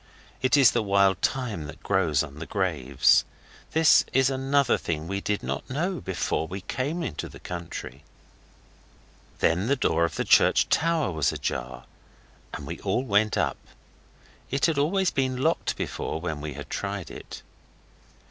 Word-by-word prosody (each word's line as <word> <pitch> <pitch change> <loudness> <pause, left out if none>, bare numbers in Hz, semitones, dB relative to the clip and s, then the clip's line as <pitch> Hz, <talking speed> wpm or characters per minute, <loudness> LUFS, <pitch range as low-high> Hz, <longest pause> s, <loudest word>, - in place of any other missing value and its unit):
It 130 +2 +3
is 135 -6 +7
the 120 - +1
wild 100 -2 +3
thyme 115 - -1
that 80 - -11
grows 85 -7 +2
on 75 0 -9
the 80 - -6
graves. 75 -10 +2 0.5
This 160 -1 +6
is 135 0 +3
another 135 0 +2
thing 80 -1 -3
we 100 +2 -3
did 105 0 -2
not 65 +2 -4
know 175 +7 -2
before 90 -3 -2
we 95 +3 -6
came 140 - -3
into 75 - -4
the - - -12
country. 85 -5 -7 1.4
Then 90 +6 +2
the 140 - +3
door 85 - +1
of 85 - -1
the - - -1
church - - +4
tower 160 - +1
was 80 -4 +1
ajar, 60 0 -4 0.7
and 75 - -7
we 85 +4 -6
all 100 +6 0
went 105 -3 +2
up; - - 0 0.9
it 135 +1 +1
had 160 -4 +1
always 185 +5 +2
been 130 -2 0
locked 160 +6 0
before 80 - -3
when 80 -3 -4
we 75 -1 -5
had - - -9
tried - - -4
it. - - -9
100 Hz, 160 wpm, -26 LUFS, 80-135 Hz, 1.4 s, is